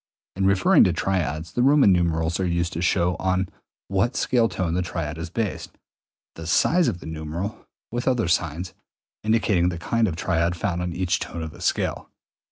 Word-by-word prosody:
In 95 0 +1
referring 95 -1 +5
to 90 - +2
triads 85 -3 -1
the 120 - -1
Roman 135 -4 +5
numerals 85 -1 0
are 95 - +1
used 85 0 -1
to 85 - -3
show 90 0 +2
on 95 0 0 0.4
what 100 +6 0
scale 115 -3 +2
tone 85 -3 -2
the 90 - +1
triad 85 -3 -4
is 80 - -5
based, 105 +1 -4 0.6
the 80 0 -8
size 175 - +3
of 85 - -2
the - - -10
numeral 80 +6 -5 0.2
(with 120 +2 -3
other 125 -6 +2
signs) 85 +1 -1 0.5
indicating 105 -5 +2
the 85 - -4
kind 115 +6 +1
of 85 - -2
triad 85 0 0
found 90 0 -2
on 90 0 -2
each 85 -1 0
tone 85 - -5
of 80 - -6
the - - -14
scale. - - -1
90 Hz, 185 wpm, -24 LUFS, 85-100 Hz, 0.6 s, referring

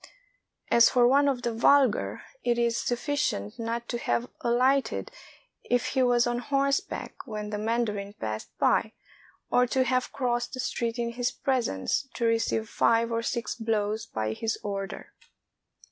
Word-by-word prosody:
As 235 -1 +7
for 245 -2 +4
one 280 +3 +4
of 255 -3 0
the 235 - -1
vulgar, 255 0 +3 0.2
it 240 -1 +1
is 235 -1 +1
sufficient 245 - -1
not 230 +1 -3
to 240 - -2
have 235 +1 -1
alighted 255 +3 +1 0.5
if 245 0 0
he 265 - +1
was 245 -1 +4
on 240 0 0
horseback 275 +2 -1
when 210 -1 -5
the 210 - -2
mandarin 210 -3 -1
passed 110 - -5
by, - - +2 0.6
or 250 0 +4
to 260 +2 +2
have 255 0 0
crossed 245 0 -1
the - - -8
street 235 -1 -2
in 235 -1 -1
his 245 +1 -1
presence, 245 - -1
to 235 - -1
receive 225 -1 +1
five 230 +1 +2
or 230 0 0
six 235 0 -2
blows 220 -1 -1
by 110 - -2
his 225 - -2
order. 195 -1 -5
235 Hz, 155 wpm, -27 LUFS, 225-250 Hz, 0.6 s, As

